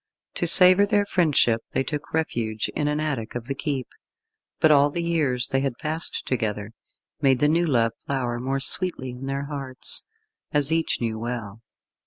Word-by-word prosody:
To 175 - -1
savour 185 +3 +7
their 205 -1 +1
friendship 150 - +2
they - - 0
took 150 +1 -6
refuge 115 -9 -2
in 145 - -1
an 150 0 -1
attic 135 -9 -3
of 120 -1 -5
the 135 - -3
keep, 135 -2 -3 0.7
but 155 - +4
all 145 0 +5
the 170 +4 -4
years 145 -8 -1
they 135 - +1
had 135 -3 -3
passed 160 +2 -1
together, 105 -4 -3 0.5
made 135 -3 +3
the 145 - +2
new 170 +3 +1
love 115 -5 +2 0.2
flower 125 -3 -2
more 135 +2 -2
sweetly 135 -3 +3
in 125 +2 -8
their 140 +1 -3
hearts, 135 -3 -2 0.5
as 145 0 0
each 165 0 0
knew 110 -2 -2
well. 115 -2 -6
135 Hz, 175 wpm, -24 LUFS, 120-155 Hz, 0.7 s, savour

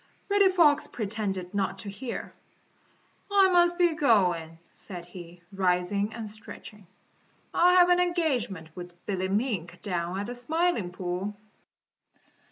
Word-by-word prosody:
Reddy 400 -1 +5
Fox 330 -6 +4
pretended 195 -4 -4
not 200 -1 -1
to 205 - -6
hear. 235 +5 -6 1.0
"I 390 -2 +5
must 350 -1 +4
be 350 -2 +3
going," 180 - +2 0.2
said 180 -4 -7
he, 175 -1 -12
rising 190 +2 0
and 225 -2 -5
stretching. 210 -1 -11 0.7
"I 360 +1 +5
have 360 -1 +6
an 355 0 +5
engagement 275 - 0
with 175 -1 -9
Billy 190 -2 -1
Mink 190 -5 -2
down 175 -2 -2
at 200 - -3
the 245 - -5
Smiling 245 - 0
Pool." 185 +3 -4
205 Hz, 130 wpm, -27 LUFS, -, 1.0 s, have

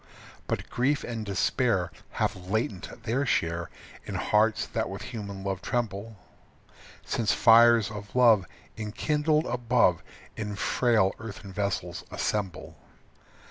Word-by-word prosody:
But - - -2
grief 140 +4 0
and 115 -2 -4
despair 100 -3 +1 0.2
Have 90 0 -2
latent 110 +1 -3
their 120 +4 0
share 85 -9 0 0.3
In - - -6
hearts 110 +1 +2
that - - -2
with - - -6
human 100 -3 -6
love 95 -1 -3
tremble, 110 -2 -3 0.9
Since 115 -3 +1
fires 115 -1 +6
of 105 +1 -9
love 115 -7 +5 0.3
Enkindled 150 +8 0
above 120 -8 +2 0.3
In 105 -1 -4
frail 110 -3 +2
earthen 100 -3 -8
vessels 95 -3 -2
assemble. 100 -4 -3
110 Hz, 115 wpm, -27 LUFS, 100-120 Hz, 0.9 s, fires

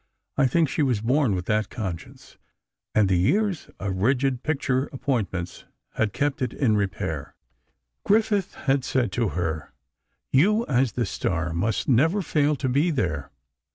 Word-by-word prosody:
I 135 -2 +4
think 160 +5 +2
she 150 - -1
was 130 -7 +2
born 125 -1 +2
with 90 -1 -3
that 105 0 0
conscience, 95 -7 -7 0.6
and 105 -2 +4
the 95 -2 +2
years 195 - +1
of 95 -1 -3
rigid 130 +4 +1
picture 135 -3 0
appointments 105 -10 -3 0.3
had 110 -2 0
kept 145 +3 -1
it 125 -3 -1
in 115 -6 +2
repair. 95 -7 -3 0.7
Griffith 210 -2 +2
had 135 -1 0
said 125 -6 0
to 115 +1 0
her: 80 -3 -3 0.6
"You, 210 - +4
as 130 -2 +1
the 120 - 0
star, 85 -1 -2
must 100 +6 -1
never 160 - +3
fail 150 -2 +2
to 130 -1 -2
be 140 +7 +2
there. 80 - -1
125 Hz, 155 wpm, -25 LUFS, 95-145 Hz, 0.7 s, I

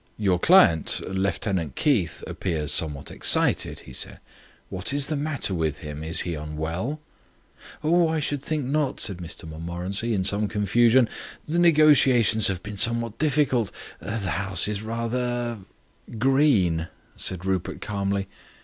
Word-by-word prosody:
"Your 95 -4 +1
client, 120 - +4
Lieutenant 95 - -2
Keith, 95 - 0
appears 80 -6 -3
somewhat 75 -2 0
excited," - - +2
he 65 - -13
said. - - -2 0.5
"What 95 +7 -2
is 140 -1 +2
the 155 - -1
matter 145 -8 -1
with 80 -4 -1
him? 75 -1 -8
Is 80 +2 +3
he 85 - -2
unwell?" 80 - -4 0.8
"Oh, 170 +2 +3
I 160 0 -1
should 145 -2 -2
think 150 -2 -3
not," 140 0 -1
said 95 - +1
Mr 85 0 -9
Montmorency, 90 +8 -2
in 95 - 0
some 105 +3 +1
confusion. 115 +5 +3 0.4
"The 165 +3 -1
negotiations 140 - +5
have 95 -2 -2
been 105 -1 -7
somewhat 115 +1 0
difficult 135 -8 +1 0.3
the 110 - -5
house 95 -1 +1
is 105 -1 -3
rather 120 +1 -3 0.3
" 115 - -15
"Green," 110 - +2 0.3
said 90 -1 -2
Rupert 95 -2 -2
calmly. 100 -1 -3
105 Hz, 140 wpm, -24 LUFS, 90-130 Hz, 0.8 s, negotiations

